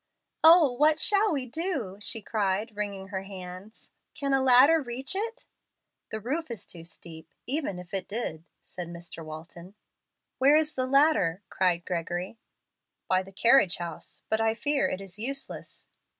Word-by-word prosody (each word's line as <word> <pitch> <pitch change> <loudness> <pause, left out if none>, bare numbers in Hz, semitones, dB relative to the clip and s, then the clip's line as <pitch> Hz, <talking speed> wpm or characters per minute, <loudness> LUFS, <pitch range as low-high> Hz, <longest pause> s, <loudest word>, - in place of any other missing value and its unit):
"Oh, 320 -3 +8
what 300 +5 +3
shall 410 +3 +5
we 275 -4 -2
do?" 260 - -4
she 225 +1 +1
cried, 210 +1 -1
wringing 200 -2 -4
her 190 -1 -3
hands. 190 +1 -10 0.2
"Can 275 -1 -1
a 270 - +3
ladder 265 +5 +6
reach 265 +5 -4
it?" 460 +5 -4 0.6
"The 220 - -4
roof 290 +9 -3
is 230 -5 -6
too 170 -2 -8
steep, 165 -1 -9 0.2
even 270 - -2
if 180 0 -11
it 190 -2 -3
did," 200 -8 -4 0.2
said 180 -2 -7
Mr. 170 -1 -7
Walton. 170 +4 -10 0.6
"Where 275 +3 +6
is 305 0 +2
the 255 0 -1
ladder?" 265 - +3
cried 175 -2 +1
Gregory. 180 +4 -4 0.7
"By 185 0 +2
the 190 +1 -12
carriage 210 -1 +5
house. 170 -2 -6
But 220 0 0
I 225 0 +1
fear 290 +3 +1
it 185 - -4
is 195 +1 -7
useless." 270 +4 -4
215 Hz, 160 wpm, -27 LUFS, 180-275 Hz, 0.7 s, Oh